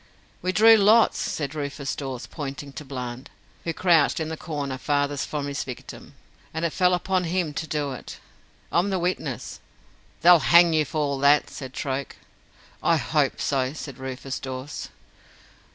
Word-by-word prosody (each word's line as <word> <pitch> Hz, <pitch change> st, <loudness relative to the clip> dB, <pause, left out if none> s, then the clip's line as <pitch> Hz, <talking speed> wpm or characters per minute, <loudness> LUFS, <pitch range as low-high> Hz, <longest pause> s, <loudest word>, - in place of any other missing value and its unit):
"We 185 Hz, -, 0 dB
drew 225 Hz, +3 st, +7 dB
lots," 215 Hz, +3 st, +5 dB
said 145 Hz, -2 st, -3 dB
Rufus 140 Hz, -2 st, -4 dB
Dawes, 135 Hz, -4 st, -5 dB
pointing 140 Hz, -2 st, -7 dB
to 150 Hz, -, -7 dB
Bland, 125 Hz, -2 st, -6 dB, 0.4 s
who 165 Hz, -, 0 dB
crouched 165 Hz, -4 st, +3 dB
in 160 Hz, -1 st, -2 dB
the 160 Hz, -, -3 dB
corner 145 Hz, -5 st, -4 dB
farthest 145 Hz, 0 st, 0 dB
from 150 Hz, -2 st, -3 dB
his 140 Hz, 0 st, -3 dB
victim, 125 Hz, -2 st, -9 dB, 0.4 s
"and 160 Hz, +1 st, -1 dB
it 165 Hz, -, -1 dB
fell 180 Hz, -1 st, +3 dB
upon 180 Hz, 0 st, 0 dB
him 170 Hz, -2 st, -1 dB
to 160 Hz, -, -4 dB
do 145 Hz, -3 st, -2 dB
it. 130 Hz, -, -8 dB, 0.5 s
I'm 180 Hz, +4 st, +2 dB
the 190 Hz, -, 0 dB
witness." 180 Hz, +1 st, -3 dB, 0.6 s
"They'll 175 Hz, 0 st, +8 dB
hang 170 Hz, +1 st, +6 dB
you 155 Hz, -1 st, +3 dB
for 155 Hz, -, -6 dB
all 140 Hz, -2 st, 0 dB
that," 140 Hz, +2 st, +4 dB
said 130 Hz, -1 st, -8 dB
Troke. 135 Hz, -1 st, -3 dB, 0.7 s
"I -, -, +3 dB
hope -, -, 0 dB
so," 130 Hz, -1 st, 0 dB
said 140 Hz, -4 st, -8 dB
Rufus 130 Hz, +1 st, -5 dB
Dawes. 130 Hz, +2 st, -6 dB
145 Hz, 165 wpm, -25 LUFS, 135-170 Hz, 0.7 s, They'll